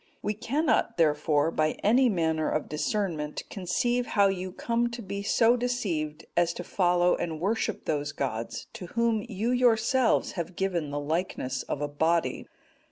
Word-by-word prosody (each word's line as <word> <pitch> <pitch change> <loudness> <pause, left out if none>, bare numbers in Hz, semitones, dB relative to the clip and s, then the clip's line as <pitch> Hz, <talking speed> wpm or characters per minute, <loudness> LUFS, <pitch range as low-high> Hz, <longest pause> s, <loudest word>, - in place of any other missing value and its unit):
We 210 - 0
cannot, 280 - 0
therefore, 150 -1 +2
by 155 -1 +1
any 245 +5 +5
manner 160 -5 0
of 155 - -1
discernment 155 -3 -2
conceive 240 +6 0
how 200 -1 +4
you 185 -1 -3
come 235 +5 0
to 235 0 -7
be 200 0 -4
so 225 +3 +4
deceived 180 -12 -2
as 175 -1 +2
to 180 - -6
follow 175 -1 +2
and 160 -2 -3
worship 205 +6 -1
those 145 -1 -1
gods, 120 -5 -4
to 205 -6 -8
whom 230 -2 +2
you 220 +3 -1
yourselves 245 0 +3
have 175 0 -5
given 175 -6 -1
the 145 +1 -3
likeness 145 -4 -2
of 145 - -4
a - - 0
body. 160 +3 0
180 Hz, 160 wpm, -28 LUFS, 155-225 Hz, -, any